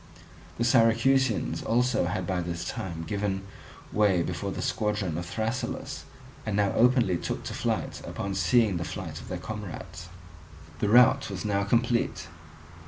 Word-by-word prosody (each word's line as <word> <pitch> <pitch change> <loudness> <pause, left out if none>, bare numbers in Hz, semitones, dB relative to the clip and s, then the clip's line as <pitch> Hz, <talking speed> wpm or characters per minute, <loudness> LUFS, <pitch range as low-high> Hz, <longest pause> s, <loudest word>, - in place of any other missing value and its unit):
The 120 - 0
Syracusans 120 +1 +3
also 120 -4 +2
had 90 0 -2
by 90 0 -1
this 85 0 -4
time 95 -8 -4
given 100 0 -2 0.5
way 100 -5 +3
before - - -3
the - - -4
squadron 105 -6 -1
of 85 +1 -4
Thrasyllus, 120 +6 -3 0.4
and 110 -2 -2
now 100 -2 +3
openly 120 -7 +3
took - - -4
to - - -5
flight - - -2
upon 100 0 -4
seeing 110 -2 +3
the 85 - -2
flight - - -6
of - - -12
their - - -4
comrades. 100 -5 -7 0.7
The 105 - +1
rout 125 +3 +6
was 95 -1 -5
now 100 -1 +1
complete. 115 +3 +1
105 Hz, 150 wpm, -28 LUFS, 95-120 Hz, 0.7 s, rout